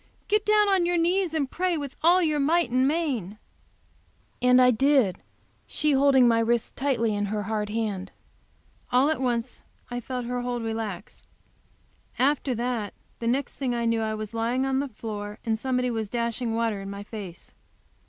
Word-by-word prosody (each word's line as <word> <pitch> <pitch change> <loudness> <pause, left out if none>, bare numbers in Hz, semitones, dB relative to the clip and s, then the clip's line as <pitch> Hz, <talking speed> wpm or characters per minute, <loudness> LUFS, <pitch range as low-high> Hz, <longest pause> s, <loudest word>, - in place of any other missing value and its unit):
Get 420 0 +1
down 425 -1 +5
on 380 -3 +3
your 350 0 +1
knees 345 0 +1
and 290 -3 0
pray 360 -1 0
with 285 -3 -6
all 355 +3 +5
your, 305 -2 +1
might 320 0 +2
and 255 +2 +3
main." 270 - -1 1.0
And 250 0 +5
I 250 0 +6
did; 250 -6 +2 0.5
she 300 - +1
holding 270 -2 +5
my 230 -1 +4
wrist 230 0 0
tightly 245 -5 0
in 205 0 -1
hard 210 0 -2
hand. 210 -4 -2 0.8
All 260 +5 +4
at 310 - -2
once 240 -1 -2 0.3
I 245 - -2
felt 250 0 -5
her 245 +1 -2
hold 245 -1 -3
relax. 220 -4 -5 1.0
After 270 0 +1
that 235 -3 -2 0.2
the 230 - -3
next 260 +3 0
thing 255 -3 -2
I 235 0 -1
knew 230 -1 +1
I 220 0 -1
was 215 0 -6
lying 235 +3 0
on 265 0 +1
the 280 - -1
floor 210 -3 -6
and 220 -1 0
somebody 250 0 0
was 220 -3 -3
dashing 235 0 -2
water 225 -3 -1
in 195 - -7
my 200 0 -6
face. 200 -5 -8
245 Hz, 175 wpm, -26 LUFS, 220-280 Hz, 1.0 s, I